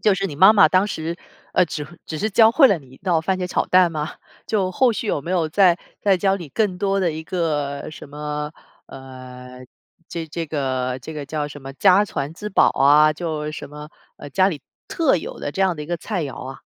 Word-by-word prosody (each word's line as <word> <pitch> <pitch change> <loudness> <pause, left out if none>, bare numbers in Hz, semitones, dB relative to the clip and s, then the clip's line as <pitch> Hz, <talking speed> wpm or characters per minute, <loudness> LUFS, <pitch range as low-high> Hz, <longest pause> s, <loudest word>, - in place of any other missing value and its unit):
就 210 - +3
是 195 +1 -2
你 145 -6 -7
妈 190 +6 +8
妈 205 -2 +6
当 185 +2 +3
时， 165 -3 -4 0.4
呃， 180 - +4
只 155 -2 -5 0.2
只 155 - -5
是 215 +1 -1
教 225 +2 +5
会 270 0 +6
了 195 - +2
你 140 - -17
一 130 - -15
道 175 -3 +1
番 185 +3 -1
茄 180 - -2
炒 - - 0
蛋 180 -1 +4
吗？ 155 -1 -4 0.3
就 195 -4 0
后 240 +6 +3
续 215 - -4
有 150 - 0
没 170 +6 -7
有 170 -4 +1
再 180 +1 +4 0.2
再 200 -2 +3
教 195 +1 +1
你 170 -6 -9
更 190 +3 -1
多 195 0 0
的 180 -3 +1
一 160 0 -6
个 150 -6 -2
什 155 - -11
么， 150 +1 -5 0.3
呃， 130 -1 -11 0.4
这 165 -1 -5
这 165 +2 -4
个 130 -4 -2
这 160 - -7
个 150 -2 -6
叫 150 0 -3
什 145 - -10
么 135 0 -8
家 195 +7 +4
传 145 -6 -4
之 210 +5 -7
宝 195 - +4
啊， 150 +2 +5
就 155 -2 -4
什 155 - -8
么， 150 +1 -10 0.3
呃， 145 - -9
家 190 +5 +3
里 155 -7 -5 0.2
特 315 - +2
有 165 - -7
的 - - -3
这 190 - -5
样 190 -2 +3
的 150 - -7
一 150 - -8
个 175 - -2
菜 185 +1 -3
肴 140 -3 -6
啊。 135 0 -9
160 Hz, 250 characters per minute, -21 LUFS, 145-190 Hz, 0.4 s, 妈